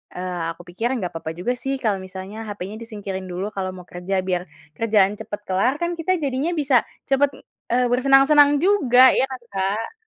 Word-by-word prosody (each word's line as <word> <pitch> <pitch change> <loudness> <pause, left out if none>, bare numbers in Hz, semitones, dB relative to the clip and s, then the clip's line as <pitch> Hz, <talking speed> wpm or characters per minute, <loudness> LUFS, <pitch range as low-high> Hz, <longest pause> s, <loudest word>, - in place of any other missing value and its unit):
eee, 180 -2 -4
aku 170 - -14
pikir 225 +7 -2
nggak 185 -7 -3
papa 160 -1 -4
juga 190 +8 -1
sih 270 +1 -2
kalau 205 -3 +1
misalnya 190 +4 -8
hapenya 205 0 -6
disingkirin 200 -4 -6
dulu 190 +4 -3
kalau 185 -1 -2
mau 180 - -10
kerja 185 +2 -2
biar 180 -1 -1 0.3
kerjaan 210 -3 +3
cepet 210 -1 -6
kelar 195 +8 +2
kan 345 0 -1
kita 370 +3 +1
jadinya 275 +4 -1
bisa 275 -5 +3 0.3
cepet, 275 +1 +3 0.4
eee, 250 +1 +3
bersenang-senang 275 +3 +5
juga 260 -11 +6
ya - - +3
kan, 260 -2 -7
Kak? 200 - -2
220 Hz, 180 wpm, -22 LUFS, 190-270 Hz, 0.4 s, juga